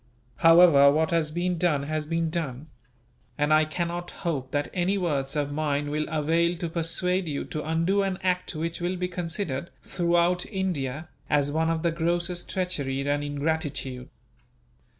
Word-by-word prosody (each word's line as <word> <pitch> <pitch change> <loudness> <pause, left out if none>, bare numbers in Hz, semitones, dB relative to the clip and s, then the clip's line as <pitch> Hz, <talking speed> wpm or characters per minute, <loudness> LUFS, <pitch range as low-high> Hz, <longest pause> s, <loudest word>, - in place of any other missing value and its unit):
However, 165 -4 +7
what 160 +2 +1
has 165 -2 +1
been 175 +2 -1
done 155 -5 +2
has 155 +1 -3
been 165 0 0
done; 155 -3 -4 0.7
and 150 +1 +2
I 155 0 +5
cannot 175 +2 -3
hope 145 -7 -3
that 145 +1 -2
any 185 +2 +1
words 145 -7 -1
of 145 -1 -1
mine 145 -1 -1
will 155 +1 -1
avail 165 +3 +1
to 170 -1 -3
persuade 180 +2 0
you 145 -2 -3
to 155 - -5
undo 165 +5 +1
an 195 -1 -1
act 180 -2 0
which 165 +2 -3
will 175 +2 -1
be 180 0 -2
considered, 170 -3 -3
throughout 175 0 +1
India, 160 - -3 0.2
as 145 -1 +2
one 160 +2 +1
of 165 0 -1
the 170 - +2
grossest 170 +2 -1
treachery 140 -7 -2
and 145 0 +1
ingratitude. 145 -3 -2
165 Hz, 160 wpm, -26 LUFS, 145-175 Hz, 0.7 s, However